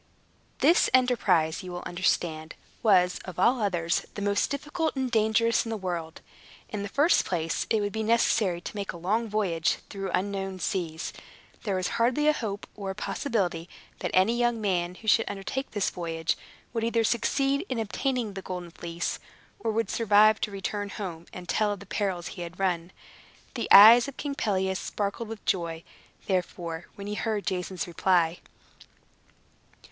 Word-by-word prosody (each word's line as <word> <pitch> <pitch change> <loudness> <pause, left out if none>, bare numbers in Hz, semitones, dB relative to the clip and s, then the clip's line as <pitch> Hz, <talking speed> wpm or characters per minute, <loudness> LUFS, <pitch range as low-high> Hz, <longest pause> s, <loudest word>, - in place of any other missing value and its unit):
This 340 - +5
enterprise, 200 -11 +2
you 185 -1 -8
will 175 0 -6
understand, 165 -3 -1 0.3
was, 185 -5 +4
of 185 - -9
all 235 +6 +3
others, 175 -5 0
the 205 - -5
most 205 0 +1
difficult 300 +3 -2
and 260 -2 -1
dangerous 225 +1 +3
in 230 - -6
the 225 - -2
world. 175 -4 -4 0.5
In 210 - -4
the 200 - -4
first 295 - +4
place 165 -3 -2
it 220 - +2
would 205 -1 -2
be 220 - -2
necessary 215 -5 +2
to - - -7
make 200 -1 -4
a - - -8
long 215 +7 0
voyage 185 -6 +1
through 195 -1 -4
unknown 195 0 -2
seas. 165 -3 -3 0.5
There 200 -3 0
was 185 -1 0
hardly 260 +6 +3
a 305 - +6
hope, 205 -7 -4
or 200 -2 -5
a 190 - -4
possibility, 195 -5 -2 0.3
that - - -2
any 190 +6 +3
young 240 -1 +1
man 180 -4 0
who 220 - -13
should 225 +1 +4
undertake 205 +7 -4
this 205 -3 -1
voyage 165 -2 -2 0.4
would 230 -2 -1
either 230 0 +2
succeed 275 +6 +1
in 255 - -2
obtaining 230 0 -1
the 195 - -6
Golden 180 -2 -6
Fleece, 170 0 -4 0.4
or 230 - -2
would 225 +1 -1
survive 215 -1 +4
to - - 0
return 205 +1 -4
home, 175 -5 -6
and 180 -1 -9
tell 210 +2 +1
of 200 - -8
the 200 - -11
perils 185 -3 -2
he 180 - -8
had 170 +1 -7
run. 180 -2 0 0.6
The - - -3
eyes 230 +5 +10
of 280 - -8
King 285 -1 -3
Pelias 190 -6 0
sparkled 210 +2 -3
with 225 -2 -8
joy, 170 -3 -1 0.4
therefore, 175 -3 -2
when 200 -1 -8
he 205 - -3
heard 210 -1 -2
Jason's 180 -1 -2
reply. 175 -1 +1
200 Hz, 170 wpm, -27 LUFS, 180-225 Hz, 0.6 s, eyes